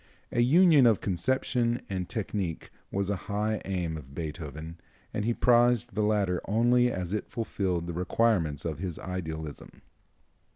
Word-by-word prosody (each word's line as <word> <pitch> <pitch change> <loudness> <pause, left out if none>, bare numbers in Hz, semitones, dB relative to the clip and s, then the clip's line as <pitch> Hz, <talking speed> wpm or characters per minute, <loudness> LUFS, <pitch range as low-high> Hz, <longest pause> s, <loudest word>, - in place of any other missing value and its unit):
A 120 - +2
union 150 0 +6
of 110 -3 +4
conception 120 +4 0
and 95 -2 -3
technique 100 -6 -3 0.2
was 100 0 -1
a - - +1
high 105 +1 0
aim 90 -4 -2
of 70 -2 -12
Beethoven, 80 0 -6 0.3
and 105 - -1
he 120 - +2
prized 120 -1 +3
the 110 - 0
latter 100 -4 +1
only 120 +3 +3
as 90 -3 -3
it 105 - -3
fulfilled 95 -7 -2
the 85 - -4
requirements 90 -4 +1
of 80 -3 -3
his 90 -3 -4
idealism. 80 -5 -6
100 Hz, 150 wpm, -28 LUFS, 85-115 Hz, 0.3 s, union